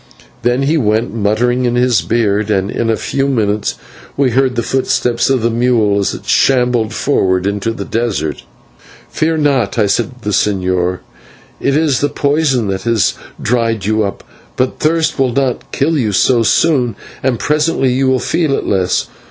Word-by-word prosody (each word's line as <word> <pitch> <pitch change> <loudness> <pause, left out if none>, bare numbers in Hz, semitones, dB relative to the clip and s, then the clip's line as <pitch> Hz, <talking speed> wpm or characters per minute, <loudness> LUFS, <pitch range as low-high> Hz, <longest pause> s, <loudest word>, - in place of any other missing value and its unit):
Then 120 +3 +1
he 155 +4 +2
went, 110 -1 0
muttering 115 +4 0
in 120 0 0
his 125 -1 +2
beard, 110 -2 0
and 100 -1 0
in 115 - -1
a 110 - +1
few 135 0 -1
minutes 105 -6 0 0.4
we 135 -3 +2
heard 130 +1 +1
the 120 - -1
footsteps 125 -2 0
of 130 -4 +1
the 115 - +2
mule 115 -4 +2
as 100 - -1
it - - -11
shambled 125 -4 +2
forward 95 -7 0
into 100 +2 -1
the 100 -3 -6
desert. 110 - -2 0.7
"Fear 160 +1 0
not," 140 -6 +1
I 110 - +3
said 110 +5 0
to 120 - -20
the 105 - -2
señor, 90 -3 0 0.6
"it 140 - +1
is 155 -4 +1
the 145 - 0
poison 140 -5 0
that 95 0 -2
has 115 -3 +1 0.3
dried 115 -3 0
you 110 +1 +1
up, 100 - -4 0.3
but 130 0 -1
thirst 160 -1 0
will 130 -3 +1
not 130 -1 -1
kill 155 +4 0
you 115 -8 0
so 120 +4 +3
soon, 125 -1 +2 0.3
and 130 -2 0
presently 150 -3 +1
you 135 +1 +1
will 130 0 +3
feel 150 +4 0
it - - -2
less. 95 -2 0
120 Hz, 175 wpm, -15 LUFS, 105-135 Hz, 0.7 s, I